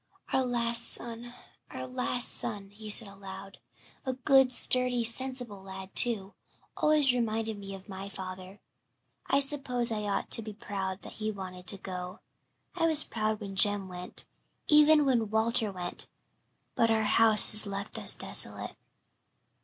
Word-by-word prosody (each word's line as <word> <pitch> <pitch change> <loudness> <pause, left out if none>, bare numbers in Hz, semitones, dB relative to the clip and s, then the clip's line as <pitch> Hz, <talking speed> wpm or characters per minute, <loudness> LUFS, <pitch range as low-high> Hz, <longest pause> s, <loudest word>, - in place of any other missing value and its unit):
"Our 265 - +1
last 235 -1 +4
son 235 0 -3 0.4
our - - -8
last 250 -1 0
son," 200 -3 -3
he 215 +1 -12
said 210 +1 +5
aloud. 195 0 -13 0.4
"A 260 - -4
good, 265 0 +2
sturdy, 250 -1 +2
sensible 245 -3 -1
lad, 190 0 -12
too. 205 -5 +2 0.4
Always 300 -4 +3
reminded 225 -3 -4
me 195 -1 -9
of 190 +1 -15
my 195 0 -9
father. 185 0 -10 0.7
I 275 - +1
suppose 260 -4 -1
I 215 -1 -4
ought 200 - -4
to - - +6
be 215 -1 -10
proud 195 -2 -7
that - - -13
he 215 - -3
wanted 185 -3 -10
to 200 - +2
go 180 -1 -9 0.6
I 330 -2 0
was 310 -2 +6
proud 215 -1 -4
when 200 -2 -9
Jem 205 -1 +4
went 180 0 -10 0.4
even 300 0 +4
when 235 -5 -1
Walter 220 0 +1
went 180 -2 -8 0.7
but 230 - 0
'our 220 -1 0
house 215 0 +5
is 215 0 0
left 200 +1 -7
us - - +3
desolate.'" - - -2
220 Hz, 155 wpm, -27 LUFS, 195-245 Hz, 0.7 s, to